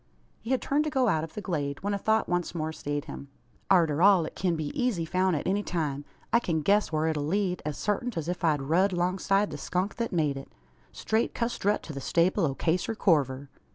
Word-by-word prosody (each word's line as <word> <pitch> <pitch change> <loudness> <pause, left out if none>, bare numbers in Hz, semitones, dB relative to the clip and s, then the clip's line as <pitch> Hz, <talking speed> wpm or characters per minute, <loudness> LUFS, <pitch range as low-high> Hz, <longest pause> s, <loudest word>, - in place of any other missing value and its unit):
He 230 - -9
had 260 -1 +1
turned 290 +2 +1
to - - 0
go 265 -4 +2
out 160 -5 +1
of 160 - -8
the 210 - -4
glade, 145 -6 -3
when 205 +1 0
a - - 0
thought 220 +2 +1
once 175 -1 -1
more 160 -1 -2
stayed 145 -1 -4
him. 140 - -8 0.4
"Arter 165 -5 +3
all, 190 -3 +6
it - - -8
kin 180 -2 0
be 155 -2 -3
eezy 235 -10 -1
foun' 185 0 +1
at 145 - -3
any 200 +2 +1
time. 150 -7 -3 0.3
I 235 - +6
kin 165 -9 -1
guess 205 +2 +3
whar 155 0 0
it'll 155 -2 0
lead, 185 +1 0
as 150 - -3
sartint, 215 +2 -2
as 160 -1 -3
if 180 +1 -3
I'd 150 -4 +2
rud 180 +7 +2
'longside 190 +3 +1
the - - -6
skunk 185 +3 -2
thet 235 -1 -2
made 150 -6 0
it 135 - -9 0.4
straight 220 +1 -1
custrut 220 -3 0
to 155 - -7
the 140 - -6
stable 170 +4 +2
o' 135 - -3
Caser 180 +9 -1
Corver. 140 - +1
175 Hz, 225 wpm, -28 LUFS, 155-205 Hz, 0.4 s, all